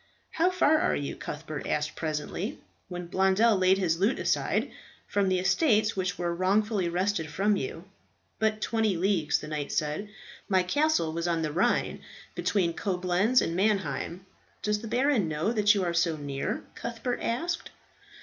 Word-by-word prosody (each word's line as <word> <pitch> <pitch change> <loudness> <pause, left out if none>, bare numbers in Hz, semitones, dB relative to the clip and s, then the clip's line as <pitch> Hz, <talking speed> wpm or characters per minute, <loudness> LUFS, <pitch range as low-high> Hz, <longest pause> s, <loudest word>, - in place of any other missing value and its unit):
"How 340 +3 +2
far 315 -4 +3
are - - +1
you," 140 -1 -3
Cuthbert 155 0 -6
asked 150 0 -1
presently, 155 +5 -3 0.3
when 180 -1 -5
Blondel 190 +5 +3
laid 185 0 +4
his 170 -4 0
lute 205 +7 +2
aside, - - 0 0.3
"from 200 -2 +1
the 185 - +2
estates 215 - +2
which 185 -1 -2
were 175 -1 -1
wrongfully 195 +1 +1
wrested 180 -2 -1
from 200 +6 +1
you?" 405 - -4 0.6
"But 215 0 +1
twenty 220 -5 +1
leagues," 180 -3 +2
the 150 - -8
knight 150 -2 -3
said. 155 +7 -2 0.4
"My 190 -2 +3
castle 290 - +1
was 170 +1 -2
on 165 -1 0
the 155 - -1
Rhine, 175 +5 +1 0.3
between 180 -1 0
Coblentz 185 +6 +1
and 165 - -2
Mannheim." 195 -2 -1 0.4
"Does 210 0 0
the 230 - -6
baron 245 - +2
know 155 +7 -1
that 210 -1 +4
you 195 - +1
are 175 -1 -1
so 170 -2 +1
near?" 140 -2 -3
Cuthbert 240 +1 -4
asked. 335 +9 -2
190 Hz, 160 wpm, -28 LUFS, 170-215 Hz, 0.6 s, laid